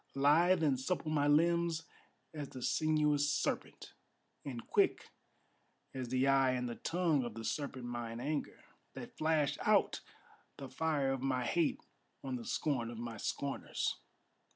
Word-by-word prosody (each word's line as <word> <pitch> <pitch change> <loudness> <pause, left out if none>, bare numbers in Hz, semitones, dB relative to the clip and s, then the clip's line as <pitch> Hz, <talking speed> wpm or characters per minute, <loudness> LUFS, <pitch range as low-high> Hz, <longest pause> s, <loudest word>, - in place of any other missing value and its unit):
Lithe 160 +6 +4
and 140 -4 +2
supple 155 +3 -2
my 145 -2 +2
limbs 165 +2 +3 0.5
as 150 -3 -5
the 130 - -8
sinuous 150 -1 +2
serpent, 140 - -2 0.5
And 125 -5 -6
quick - - +1 0.8
as 130 -2 -4
the 130 +1 +2
eye 135 -1 +4
and 125 -1 -1
the 120 - -3
tongue 165 -5 +1
of 120 -3 -6
the 115 0 -6
serpent 135 -3 -3
mine 120 -1 -4
anger 145 +4 -3 0.3
That - - -8
flashed 155 -2 +1
out - - +3 0.6
the 135 - -7
fire 145 -1 0
of 135 -1 -2
my 130 -2 0
hate 165 +4 +1 0.4
on 130 -2 -3
the 120 -2 -6
scorn 125 -6 -1
of 120 - -7
my 115 -1 -5
scorners. 140 +6 -2
140 Hz, 150 wpm, -34 LUFS, 125-155 Hz, 0.8 s, Lithe